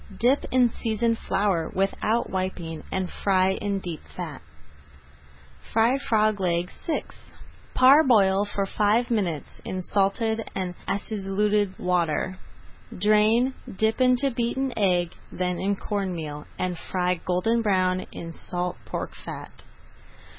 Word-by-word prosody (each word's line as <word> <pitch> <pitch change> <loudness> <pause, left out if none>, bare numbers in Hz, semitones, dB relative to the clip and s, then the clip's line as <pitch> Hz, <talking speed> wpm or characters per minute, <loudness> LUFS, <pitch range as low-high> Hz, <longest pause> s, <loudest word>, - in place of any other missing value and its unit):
Dip 255 +5 +3
in 250 -1 +4
seasoned 230 0 -1
flour 190 -5 0
without 210 +4 +1
wiping 185 -4 -4
and 190 -1 -1
fry 190 0 +2
in 200 +1 -1
deep 175 -4 -5 0.2
fat. 165 -6 -5 1.3
FRIED 235 +5 +3
FROG 215 -4 +2
LEGS 175 -1 0
VI 325 - 0 0.7
Parboil 245 -8 +6
for 200 -1 -2
five 215 +5 +1
minutes 180 -10 -2
in 185 0 -4
salted 220 +4 0
and 185 -2 -2
acidulated 205 0 0
water. 180 0 0 0.6
Drain, 215 +6 +4 0.2
dip 220 +3 +1
into 255 +2 +4
beaten 245 +2 -1
egg, 180 -4 +2 0.2
then 180 -1 -1
in 200 +1 +1
corn 195 -2 -2
meal, 150 -2 -6
and 180 -2 -2
fry 180 -1 0
golden 205 +6 +1
brown 185 -3 +1
in 165 0 -7
salt 180 +1 -4
pork - - -4
fat. - - -8
195 Hz, 120 wpm, -25 LUFS, 180-225 Hz, 1.3 s, Parboil